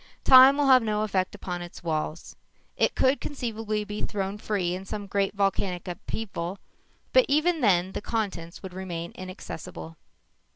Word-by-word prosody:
Time 265 +1 +9
will 290 - +2
have 260 -2 +7
no 215 -1 0
effect 190 -3 -1
upon 180 -1 -5
its 175 0 -9
walls. 155 0 -3 0.4
It - - +1
could 265 +2 +2
conceivably 225 -6 -3
be 210 0 -6
thrown 200 0 -3
free 190 -5 -1
in 185 +1 -5
some 205 +1 -5
great 200 0 -1
volcanic 195 -2 -1
upheaval 180 0 -5 0.6
but - - +6
even 315 +2 +2
then 185 -4 +3
the - - -4
contents 195 -7 -4
would 190 -2 -7
remain 175 -2 -5
inaccessible. 180 -3 -8
200 Hz, 155 wpm, -27 LUFS, 180-225 Hz, 0.6 s, Time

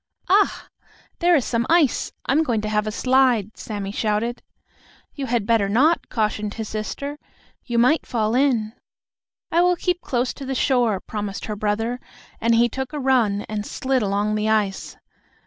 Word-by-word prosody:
"Ah! 400 +3 +2 0.5
There 350 0 +4
is 275 - +2
some 235 0 -1
ice. 325 -6 +3
I - - 0
am 295 +4 +4
going 240 -8 0
to 215 - -3
have 210 0 0
a - - -1
slide!" 250 -3 +2
Sammie 205 -3 -5
shouted. 220 +3 -1 0.7
"You 275 -2 -5
had 235 -3 0
better 220 -3 +2
not!" 290 +11 +2
cautioned 210 -2 -1
his 220 -2 -5
sister. 280 +7 -5 0.5
"You 240 -2 -2
might 250 +7 +3
fall 220 -2 0
in." 245 -5 +1 0.8
"I 335 - +4
will 360 0 +4
keep 355 0 -1
close 245 -1 -1
to 280 - -9
the 265 - -2
shore," 245 -6 +2
promised 205 -2 -5
her 210 - -4
brother, 220 +4 -1 0.4
and 230 +1 +2
he 235 +1 +4
took 265 +4 -5
a 300 - -3
run 245 -7 +2
and 210 -1 -3
slid 260 +4 -1
along 205 +1 0
the 215 0 0
ice. 210 -3 -1
230 Hz, 175 wpm, -22 LUFS, 215-265 Hz, 0.8 s, There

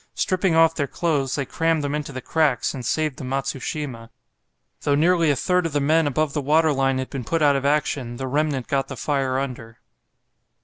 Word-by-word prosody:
Stripping 185 -2 +1
off 165 0 +5
their 145 -3 -2
clothes, 145 -4 -1
they 140 - -2
crammed 165 +2 0
them 145 0 -2
into 150 -1 -3
the 130 -1 -6
cracks, 150 -7 +1
and 130 - -6
saved 155 +3 -1
the - - -7
'Matsushima'; 135 -2 -4 0.7
though 145 - +1
nearly 165 +1 +3
a 145 - +3
third 180 +5 +1
of 160 - -8
the 145 - +2
men 155 +2 +3
above 145 +1 0
the 150 - -1
waterline 140 -2 +2
had 130 0 -4
been 135 -3 -4
put 165 +7 0
out 145 -1 +5
of 135 0 -1
action, 140 -4 0
the 130 - -4
remnant 140 -1 -1
got 135 -1 0
the 135 - -7
fire 135 0 -1
under." 120 -4 -5
145 Hz, 205 wpm, -23 LUFS, 130-155 Hz, 0.7 s, off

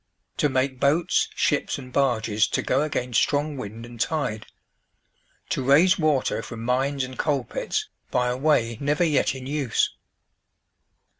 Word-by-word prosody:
To 150 - +2
make 130 0 0
boats, 160 +6 +2
ships, - - 0
and 125 -1 -10
barges 110 -6 +2
to - - -1
go 135 - +1
against 125 -6 0
strong 145 +1 0
wind 115 -2 -7
and 120 -1 -12
tide. 145 -10 -2 1.0
To - - -1
raise 160 +8 +5
water 150 -5 +1
from 115 -1 -8
mines 135 +2 0
and 130 0 -7
coal 145 -4 +1
pits - - -3 0.2
by 125 0 +1
a 125 - -1
way 125 -5 +1
never 150 +4 +1
yet 150 -5 +2
in 130 -1 -8
use." 140 -3 0
135 Hz, 150 wpm, -24 LUFS, 125-150 Hz, 1.0 s, raise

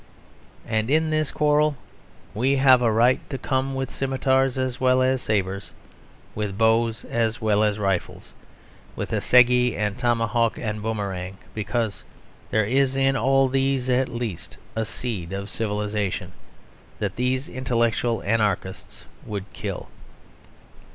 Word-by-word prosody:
And 110 +1 -1
in 155 +2 +2
this 155 -1 +1
quarrel 150 0 +2 0.6
we 130 +6 +1
have 130 -2 +6
a 115 -2 +3
right 120 +4 +4
to 135 - -3
come 135 +1 -1
with 135 0 -3
scimitars 135 -1 +1
as 130 -1 -2
well 130 0 +4
as 130 0 +1
sabres, 100 -2 -2 0.6
with 105 -2 -3
bows 115 +1 +2
as 115 -1 -1
well 110 -2 +2
as 105 -1 +1
rifles, 95 -4 -2 0.6
with - - -4
assegai 125 -1 +4
and 105 +1 -2
tomahawk 115 -1 +1
and 105 -1 -3
boomerang, 100 -4 -3 0.2
because 110 0 -2 0.5
there 110 -1 +2
is 135 +4 +2
in 135 0 +2
all 135 0 +3
these 135 -1 0
at 125 +1 +2
least 120 -7 -5 0.2
a 110 0 -1
seed 105 -7 -5
of 100 +1 -5
civilisation 105 -4 -2 0.7
that - - -3
these 130 +2 -1
intellectual 120 -2 0
anarchists 105 -3 -2 0.2
would 100 -2 -4
kill. - - -5
115 Hz, 130 wpm, -24 LUFS, 105-130 Hz, 0.7 s, have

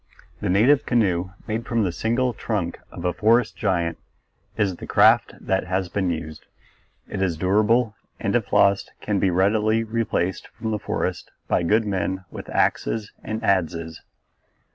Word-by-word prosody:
The - - -2
native 120 +10 +4
canoe 95 -7 +1 0.2
made 110 +1 -3
from 115 -2 +1
the 90 - 0
single 120 +7 0
trunk 100 -6 -3
of 85 - -7
a 90 - +1
forest 115 +1 +3
giant 85 -6 -1 0.6
is 95 -4 0
the - - -9
craft - - +4
that 95 0 -1
has 95 0 -1
been 95 0 -1
used. 80 -2 -5 0.6
It 100 - -4
is 90 -4 0
durable 105 +6 +2 0.3
and - - -1
if - - 0
lost 100 0 +3
can 105 -2 -1
be 95 - +2
readily 105 +5 +2
replaced 110 -5 -1
from 110 -1 -3
the 105 - -1
forest - - -3 0.2
by - - +2
good 105 +6 +2
men 95 -1 -2
with - - -8
axes 110 -2 0
and 110 +1 -4
adzes. 85 -5 0
100 Hz, 160 wpm, -23 LUFS, 90-110 Hz, 0.6 s, native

